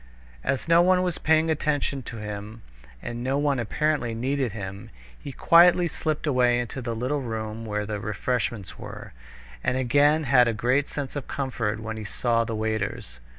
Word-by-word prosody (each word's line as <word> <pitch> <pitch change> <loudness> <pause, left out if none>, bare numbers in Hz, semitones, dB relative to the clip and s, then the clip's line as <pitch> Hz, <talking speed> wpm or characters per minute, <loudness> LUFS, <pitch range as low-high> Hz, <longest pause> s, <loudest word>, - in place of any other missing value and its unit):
As 135 - -1
no 170 +1 +6
one 185 +1 +4
was 180 -3 -2
paying 160 0 +3
any 165 - 0
attention 145 -2 -1
to 115 -1 -8
him, 105 +1 -7 0.4
and 120 0 -5
no 135 +2 0
one 145 -2 +1
apparently 125 0 0
needed 130 +1 -1
him, 100 +1 -7 0.3
he 140 - -8
quietly 175 +5 +5
slipped 155 -1 -3
away 125 -4 +3
into 120 +2 -4
the 115 -1 -3
little 130 +5 -1
room 110 -2 -5
where 105 0 -2
the 105 -1 -4
refreshments 105 0 -3
were, - - -9 0.5
and 125 - +1
again 145 +5 +3
had 125 -3 +5
a 115 - +1
great 125 +6 +1
sense 145 -1 -5
of 140 -2 -5
comfort 115 -6 -2
when 110 0 -5
he 110 - -6
saw 115 +2 0
the 115 -1 -4
waiters. 110 - -3
125 Hz, 180 wpm, -25 LUFS, 110-145 Hz, 0.5 s, no